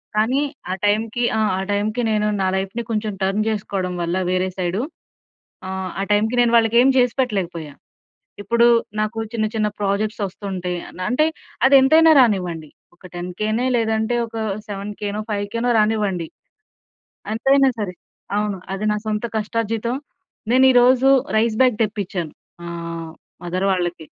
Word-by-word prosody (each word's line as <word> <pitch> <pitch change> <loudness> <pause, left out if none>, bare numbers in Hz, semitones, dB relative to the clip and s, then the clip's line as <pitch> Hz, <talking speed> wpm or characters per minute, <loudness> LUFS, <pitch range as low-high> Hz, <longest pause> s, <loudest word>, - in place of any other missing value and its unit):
కానీ 235 +6 +2 0.3
ఆ - - +1
టైమ్‌కి 220 +3 0
ఆ! - - +1 0.2
ఆ - - -2
టైమ్‌కి 210 +4 0
నేను 210 0 +1
నా 190 - +2
లైఫ్‌ని 195 +5 -3
కొంచెం 215 -1 -1
టర్న్ 195 +2 +1
చేసుకోవడం 195 -4 -2
వల్ల 170 +1 -1
వేరే 185 0 +1
సైడు 185 +3 -1 0.9
ఆ! - - -5 0.3
ఆ - - 0
టైమ్‌కి 215 +3 +2
నేను 240 -1 +3
వాళ్ళకి 225 0 +3
ఏమి 265 +2 +5
చేసిపెట్టలేకపోయా. 195 - -1 0.7
ఇప్పుడు 235 +4 +3 0.3
నాకు 215 +1 -2
చిన్న 220 -2 0
చిన్న 215 -1 +1
ప్రాజెక్ట్స్ 210 +2 -1
వస్తుంటాయి. 185 -2 -5 0.3
అంటే 255 +5 +2 0.4
అదెంతైనా 280 +4 +6
రానివ్వండి. 180 - +1 0.2
ఒక 175 - -28
టెన్‌కెనో 215 +7 -2
లేదంటే 220 0 0
ఒక 225 0 -10 0.3
సెవెన్‌కెనో 205 +1 -4
ఫైవ్‌కెనో 215 +4 -1
రానివ్వండి. 210 -6 0 1.1
ఎంతైనా 270 +4 +4
సరే. 200 -4 -3 0.4
అవును. 210 -2 -1 0.2
అది 195 +2 -4
నా - - 0
సొంత 215 +1 -2
కష్టార్జితం. 225 +2 -2 0.6
నేను 260 +1 +5
ఈరోజు 250 +1 +5 0.3
రైస్ 220 0 +1
బాగ్ 250 -4 +3
తెప్పించాను 195 -6 -4 0.3
మా 170 - -6 0.7
మదర్ 180 +2 -1
వాళ్ళకి. 175 -3 -1
210 Hz, 130 wpm, -21 LUFS, 190-230 Hz, 1.1 s, అదెంతైనా